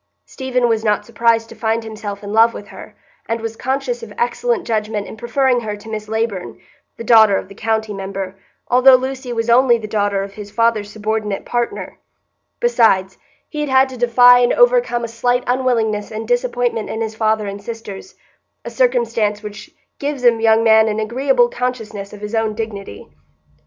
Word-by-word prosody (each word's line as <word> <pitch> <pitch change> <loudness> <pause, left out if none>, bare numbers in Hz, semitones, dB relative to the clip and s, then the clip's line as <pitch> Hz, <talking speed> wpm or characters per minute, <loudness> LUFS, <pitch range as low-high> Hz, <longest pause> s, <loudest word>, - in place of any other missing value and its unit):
Stephen 255 -2 -1
was 225 -1 0
not 210 -1 0
surprised 230 0 +1
to - - -12
find 225 0 -1
himself 210 -2 -7
in 205 +1 -6
love 225 +1 +4
with 205 - -9
her, - - -12 0.3
and 230 0 -2
was 225 0 -5
conscious 275 - -2
of 460 - -9
excellent 480 0 -1
judgment 215 -2 -2
in - - -9
preferring 250 +2 +1
her 210 -3 -5
to 215 +2 -12
Miss 215 -1 -5
Leyburn, 220 -4 -3 0.4
the - - -6
daughter 220 -3 +6
of - - -5
the - - -11
county 220 0 -2
member, 195 -1 -5 0.3
although 255 +1 +6
Lucy 260 0 -3
was 230 -1 -2
only 240 0 +5
the 220 -2 -7
daughter 205 -2 0
of 195 0 -8
his 205 -1 -9
father's 225 -1 0
subordinate 215 -1 -3
partner; 240 -1 -3 0.6
besides, 220 - +2 0.3
he 300 - -7
had 295 - -2
had 265 0 +4
to 260 - -9
defy 245 +1 +6
and 245 - +3
overcome - - +3
a - - -2
slight 245 +2 0
unwillingness 235 -5 0
and 220 0 -6
disappointment 245 - -1
in 220 - -4
his 220 -1 -3
father 220 -1 0
and 200 0 -6
sisters,—a 225 - -11
circumstance 230 -4 0
which 210 +7 -9 0.3
gives 285 -2 -3
a 240 - +7
young 225 0 +4
man 220 -1 +5
an 215 0 -1
agreeable 245 +3 +2
consciousness 225 -5 -4
of 210 - -11
his 210 +1 -6
own 225 -1 0
dignity. 200 - -7
225 Hz, 180 wpm, -18 LUFS, 210-245 Hz, 0.6 s, a